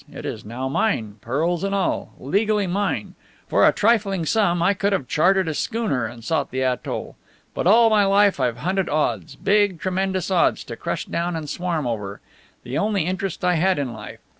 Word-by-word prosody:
It - - -8
is - - -5
now 120 +5 -4
mine, 115 - -1
pearls 160 - -1
and 195 0 0
all, 195 -2 -1
legally 205 - +1
mine. 195 +3 -2 0.3
For - - +4
a - - +6
trifling 200 -5 +1
sum 185 -2 +2
I 195 - +4
could 200 +1 0
have 140 -10 -1
chartered 185 +6 +3
a 160 - -1
schooner 205 - -1
and 115 0 -11
sought 150 +1 -1
the 130 0 -2
atoll. 130 -1 -3 0.4
But - - -1
all 225 +3 +6
my 210 -2 +4
life 200 -3 +3
I've 125 -3 0
hunted 185 +7 -1
odds 120 - -1
big, 200 -2 +2
tremendous 190 +1 -1
odds 180 -2 +2
to 115 - -7
crush 170 +5 -4
down 170 +1 -2
and 160 -2 -5
swarm 170 -2 -2
over. 105 -4 -4 0.4
The 125 +2 -3
only 205 -3 +1
interest 185 0 -3
I 180 -1 +3
had 185 +2 +2
in 135 -4 -2
life. 110 -1 -9
175 Hz, 190 wpm, -22 LUFS, 130-195 Hz, 0.4 s, a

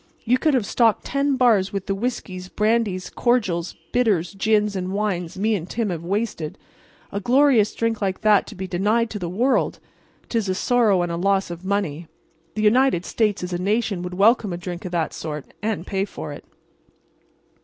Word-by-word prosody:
Ye 245 +2 +4
could 290 +2 +2
have 240 -5 +1
stocked 225 0 +2
ten 275 0 +1
bars 225 -7 +3
with 195 -2 -4
the 195 - -1
whiskies, 195 -4 -4
brandies, 210 -4 0
cordials, 195 -9 0 0.2
bitters, 205 -9 +1
gins 210 0 +1
and 185 0 -3
wines 195 -3 -2
me 215 +3 +1
and 180 -4 -3
Tim 225 -4 -1
have 170 -2 -4
wasted. 195 -4 -2 0.5
A 200 - -2
glorious 245 -1 +3
drink 230 -1 -1
like 190 -2 -1
that 210 -2 +4
to 215 - -9
be 190 0 -5
denied 210 +6 +1
to 210 - -4
the 175 -2 -3
world! 240 +9 +1 0.5
'Tis 225 -5 -1
a 185 - 0
sorrow 215 -5 +3
and 175 - -2
a 170 - -2
loss 195 0 +1
of 170 +1 -8
money. 185 -5 -2 0.5
The 215 - -1
United 220 -4 +3
States 210 -4 0
as 180 0 -4
a 175 - -1
nation 205 -1 0
would 180 0 -5
welcome 210 +1 +4
a 175 - -3
drink 175 0 -6
of 180 - -5
that 170 -3 -1
sort, 150 -3 -6
and 210 -4 -2
pay 195 0 -1
for - - -7
it." - - -11
200 Hz, 190 wpm, -23 LUFS, 180-225 Hz, 0.5 s, Ye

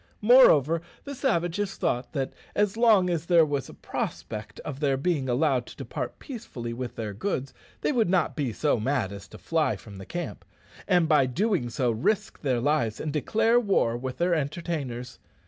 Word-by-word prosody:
Moreover, 165 - +6 0.2
the 280 - -6
savages 205 - -1
thought 125 +1 -2
that 135 -3 -2 0.2
as 205 0 +2
long 220 -5 +5
as 165 -1 -2
there 170 -3 +6
was 145 -3 -2
a - - -10
prospect 105 -1 -5
of 140 -2 -6
their 140 -3 +1
being 140 -3 0
allowed 125 -1 +1
to - - -11
depart - - -5
peaceably 170 - -7
with 125 0 -5
their 110 -3 -4
goods, 135 - -3 0.3
they - - +1
would 230 -9 +2
not 185 -1 +1
be 140 -6 -1
so 140 +2 +1
mad 120 -4 0
as 100 0 -9
to - - -12
fly 160 -8 0
from 100 +1 -12
the 95 - -8
camp, 175 0 -5 0.4
and, 175 -4 +3
by 150 -4 +5
so - - -6
doing, 185 - 0 0.3
risk 215 +4 0
their 130 -5 +1
lives 125 -4 0
and 150 -2 -3
declare 225 - +3
war 195 - +1
with 130 +1 -5
their 175 +1 +2
entertainers. 140 -5 -3
150 Hz, 180 wpm, -27 LUFS, 125-180 Hz, 0.4 s, Moreover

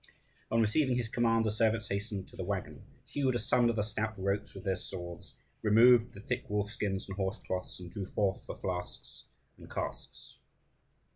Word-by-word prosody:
On 115 - +2
receiving 125 +4 +3
his 120 -2 0
command, 115 0 +2
the 110 - +2
servants 110 0 +2
hastened 100 -1 -3
to - - -14
the - - -4
waggon, - - -3 0.2
hewed 135 -3 0
asunder 120 +1 +3
the 105 -2 +1
stout 110 +1 -2
ropes 100 +2 -1
with 95 - -8
their 95 -2 +1
swords, 90 -1 -7 0.3
removed 115 +2 +6
the - - -8
thick 125 +4 -3
wolf 105 0 0
skins 95 -3 -2
and 95 - -5
horsecloths, 95 -2 -3
and 90 -2 -9
drew 95 0 -4
forth 100 -2 0
the - - -5
flasks 90 -1 -5 0.3
and - - -12
casks. - - -6
105 Hz, 170 wpm, -32 LUFS, 95-115 Hz, 0.3 s, removed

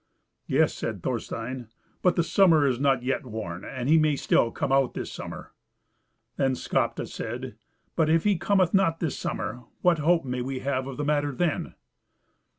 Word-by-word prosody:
"Yes," - - +3
said - - -5
Thorstein; 120 +1 -4 0.3
"but 180 - +3
the 170 - +2
summer 165 -4 +4
is 130 -3 +1
not 135 -3 +2
yet 130 +1 -1
worn, 105 -7 -6
and 130 -1 -5
he 160 +2 +6
may 155 -1 +3
still 115 - +2
come 135 - -3
out 135 -2 +2
this - - -4
summer." - - -8 0.8
Then 135 -1 +2
Skapti - - -1
said, - - -6 0.4
"But 160 -2 +2
if 165 0 +3
he 205 -1 +3
cometh 185 0 +2
not 190 -4 +3
this 160 -6 -1
summer, 125 0 -4 0.2
what 175 -3 +4
hope 165 +1 +3
may 125 -1 -2
we 130 +1 -4
have 130 -1 -1
of 135 - -7
the 150 - -2
matter 145 -1 +1
then?" 155 +4 -1
140 Hz, 175 wpm, -26 LUFS, 130-165 Hz, 0.8 s, he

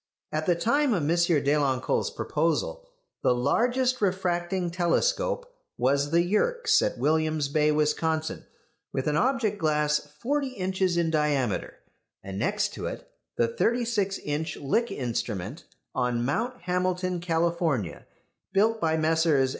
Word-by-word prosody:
At 155 +1 -2
the 175 - +4
time 235 - +2
of 170 - -1
M. 160 +4 +2
Deloncle's 145 -6 +2
proposal - - -1 0.3
the 125 - +3
largest 245 - +1
refracting 180 -2 0
telescope 485 - +1 0.3
was 140 +3 +2
the 170 +2 +3
Yerkes' 475 - +2
at - - -1
William's 155 -2 +1
Bay, 150 +1 +3
Wisconsin, 155 +1 0 0.4
with 135 - -2
an 150 - +1
object 220 - +1
glass 150 -1 +2 0.2
forty 275 +1 -1
inches 185 -1 0
in 165 -2 +1
diameter; 145 -8 0 0.5
and 95 0 -6
next 210 - 0
to - - -4
it - - -7 0.3
the - - +3
36 230 - 0
inch 150 +2 -2
Lick 230 - 0
instrument 115 - -4 0.3
on 120 -1 0
Mount 240 - -2
Hamilton, 180 0 0
California, 165 - -1 0.5
built 220 +3 +2
by 160 0 +2
Messrs. 160 -4 +3
170 Hz, 130 wpm, -27 LUFS, 150-210 Hz, 0.5 s, the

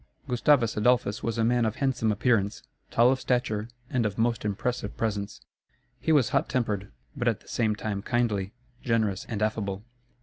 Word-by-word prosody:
Gustavus 125 -2 +3
Adolphus 110 -1 +2
was 115 0 -2
a 115 - +2
man 120 +1 +3
of 110 -1 0
handsome 125 -5 +1
appearance, 105 -1 +1 0.3
tall 120 +2 +5
of 130 - 0
stature, 115 -4 -1 0.2
and 125 -2 0
of 105 -2 -2
most 115 0 +1
impressive 105 +2 -2
presence. 105 -2 -2 0.6
He 140 +7 0
was 140 -7 +4
hot - - +1
tempered; 105 -6 -1 0.2
but 125 -3 -2
at 115 -2 +1
the - - -22
same 110 -3 0
time 105 -2 -3
kindly, 105 -4 0 0.3
generous, 110 -5 0
and 105 -2 -2
affable. 100 -2 -2
115 Hz, 170 wpm, -27 LUFS, 105-120 Hz, 0.6 s, tall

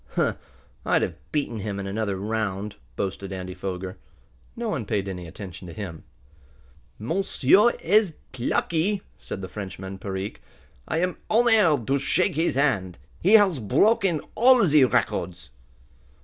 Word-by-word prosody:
"Huh! - - +1 0.5
I'd - - +2
have - - -6
beaten 140 -7 -1
him 100 -1 -4
in 100 - -4
another 100 0 -2
round," 105 -1 -3 0.2
boasted 100 +2 -4
Andy 95 -1 -5
Foger. 95 0 -5 0.6
No 235 -1 -3
one 145 - -2
paid 100 -2 -2
any 90 -2 -6
attention 90 +1 -9
to 85 - -9
him. 90 -7 -7 0.9
"Monsieur 190 - +3
ezz 200 0 +3 0.2
plucky!" 165 - 0 0.2
said 95 - -6
the - - -4
Frenchman, 95 0 -7
Perique. 95 +1 -5 0.5
"I - - -1
am 180 0 -1
honaired 215 - +4
to 140 +3 +1
shake 185 +7 +1
his 160 0 0
hand! 100 -11 +1 0.2
He 195 +5 +4
has 200 -9 +6
broken 170 - +2
all 250 -1 +6
ze 150 -4 +5
records!" 90 - -1
110 Hz, 140 wpm, -25 LUFS, -, 0.9 s, has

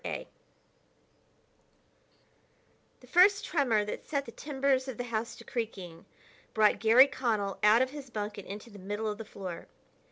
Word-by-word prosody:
] - - -33
The - - -4 2.8
first 390 +3 +5
tremor 240 -9 +1
that 210 - -6
set 280 -2 -1
the 230 - -9
timbers 275 -1 0
of 260 -4 -6
the 245 - -3
house 230 -1 -3
to - - -12
creaking 190 -8 -5 0.5
brought 215 -1 +4
Garry 230 +4 +7
Connell 220 -8 -2
out 215 +4 +6
of 260 - -4
his 285 -2 -9
bunk 210 -2 -4
and 200 - -10
into 210 +4 -8
the 205 - -12
middle 205 +3 -4
of 210 0 -3
the 225 - -6
floor. 185 -4 -8
225 Hz, 160 wpm, -30 LUFS, 205-265 Hz, 2.8 s, Garry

